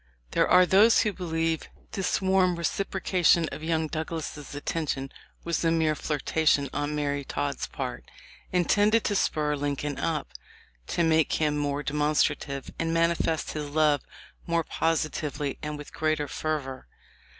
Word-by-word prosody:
There - - +3
are 180 0 +6
those 205 +5 +6
who 210 - 0
believe 165 -3 -2 0.2
this 195 0 -1
warm 190 -1 +3
reciprocation 175 -1 +1
of - - -7
young 160 0 0
Douglas' 160 0 -4
affection 145 -1 -4 0.3
was 170 0 -1
a 165 - +3
mere 160 -2 +2
flirtation 150 -1 +1
on 145 +1 -2
Mary 145 -1 -1
Todd's 140 0 -3
part, - - -6 0.4
intended 205 +5 +3
to 205 - 0
spur 150 -5 +1
Lincoln 145 0 -3
up, 160 -2 -2 0.6
to 170 - 0
make 160 -1 +3
him 150 -2 +1
more 145 0 -1
de 145 - -3
monstrative, 150 -2 0
and 165 0 0
manifest 165 -1 +1
his 150 -1 -4
love 150 -2 +3 0.5
more 170 -1 +1
positively 155 -3 -1
and 150 -1 -4
with 150 - -10
greater 155 -1 0
fervor. 140 -3 -3
155 Hz, 140 wpm, -27 LUFS, 145-170 Hz, 0.6 s, are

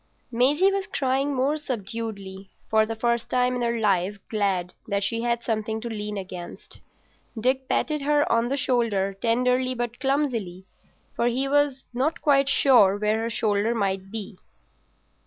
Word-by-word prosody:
Maisie 290 +11 +3
was 395 0 -2
crying 275 -5 0
more 275 +4 +1
subduedly, 205 -7 -5 0.2
for 220 0 +4
the 225 - -3
first 235 +1 0
time 250 0 +2
in 245 - -2
her 235 0 0
life 200 -1 +1
glad 195 -5 -1
that 200 -1 -1
she 230 +3 -1
had 235 0 -1
something 220 -1 -2
to 235 - -6
lean 210 -1 -4
against. 185 -2 -8 0.6
Dick 260 +3 0
patted 300 -1 0
her 290 +1 +2
on 230 +1 +2
the 275 - -1
shoulder 230 -7 +1
tenderly 250 +4 +1
but 240 -1 -4
clumsily, 250 -10 -1 0.5
for 235 - +1
he 255 +3 0
was 285 -1 +1
not 270 +6 0
quite 280 -2 +3
sure 225 -9 +5
where 210 +1 0
her 230 +1 -2
shoulder 215 0 0
might 195 -3 -1
be. 210 -2 -7
235 Hz, 155 wpm, -25 LUFS, 205-260 Hz, 0.6 s, sure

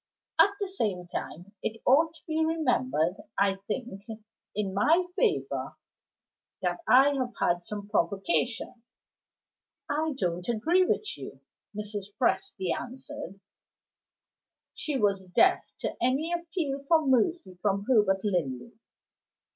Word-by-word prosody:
At - - +8
the 400 - -1
same 205 - -2
time 180 +4 -6
it 225 +1 -3
ought 315 +5 +4
to - - -16
be 320 0 0
remembered, 185 - +1 0.2
I 195 -1 +3
think, 230 -4 -4 0.5
in 200 -2 -1
my 320 - +4
favor, 430 -6 0 0.9
that - - 0
I 270 +3 +7
have 255 -3 -2
had 175 0 +1
some 205 +2 -6
provocation." 230 - 0 1.1
"I 310 +1 0
don't 175 -1 -2
agree 330 +11 +3
with 425 - -1
you," - - -9 0.3
Mrs. 210 -1 -4
Presty 235 - +1
answered. 260 -4 -8 1.3
She 300 -4 -2
was 195 -4 +1
deaf 180 - +3
to - - -2
any 275 +8 +1
appeal 330 -5 -2
for 320 -1 +4
mercy 260 - +2
from 200 -1 0
Herbert 205 -6 +4
Linley. 175 - -1
240 Hz, 120 wpm, -28 LUFS, 195-315 Hz, 1.3 s, At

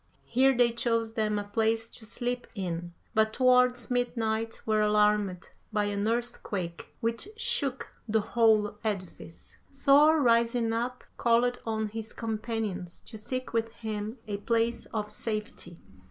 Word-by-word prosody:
Here 265 +1 +3
they 240 -1 +5
chose 230 -1 0
them 215 -2 0
a 205 - -1
place 225 +2 0
to 220 - -12
sleep 245 +2 -3
in; 175 -3 -4 0.2
but 220 -1 +3
towards 250 -1 +3
midnight 225 -2 -1
were 215 -1 +2
alarmed 210 -3 +2 0.2
by 210 -1 +1
an 205 0 -1
earthquake 210 -7 -3
which 230 +9 -1
shook 290 - -1 0.2
the 220 0 +2
whole 215 -2 +2
edifice. 185 -6 -5
Thor, 290 +3 +5
rising 235 -2 +3
up, 245 +2 -2
called 240 +1 +3
on 220 -1 -1
his 220 +1 -6
companions 215 -5 -3
to 230 - -12
seek 255 +4 -4
with 230 0 0
him 215 +1 -4
a 205 -1 -2
place 230 +2 0
of 210 -1 -3
safety. 210 -6 -4
225 Hz, 140 wpm, -29 LUFS, 210-240 Hz, 0.2 s, they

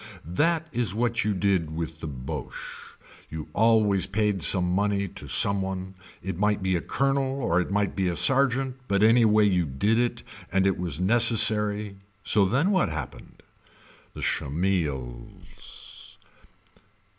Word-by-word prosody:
That 160 - 0
is 115 - -1
what 120 0 0
you 105 0 -1
did 90 -5 0
with 80 -1 -5
the 80 - -6
Boche. 65 -3 -8 0.3
You 80 0 -7
always 105 -3 +2
paid 105 -1 -1
some 90 +2 +3
money 100 +2 0
to - - -9
some 100 -1 +1
one 95 0 -5 0.3
it 95 -2 -5
might 105 -1 +1
be 95 -1 +1
a 85 - -1
colonel 135 0 -1
or 85 -3 +2
it - - -5
might 100 0 -1
be 95 -2 0
a 85 - -1
sergeant 135 +2 +2
but 100 +1 +1
anyway 110 -2 +4
you 90 -4 +1
did 100 - 0
it 120 0 -1 0.3
and 95 +1 +2
it 95 -2 +1
was 85 -4 -2
neccesary 105 -1 +3 0.3
so 100 -2 +3
then 135 - +1
what 185 - +2
happened. 75 -2 -8 0.7
The - - -8
Schemmels. 70 -7 -4
100 Hz, 145 wpm, -25 LUFS, 90-115 Hz, 0.7 s, anyway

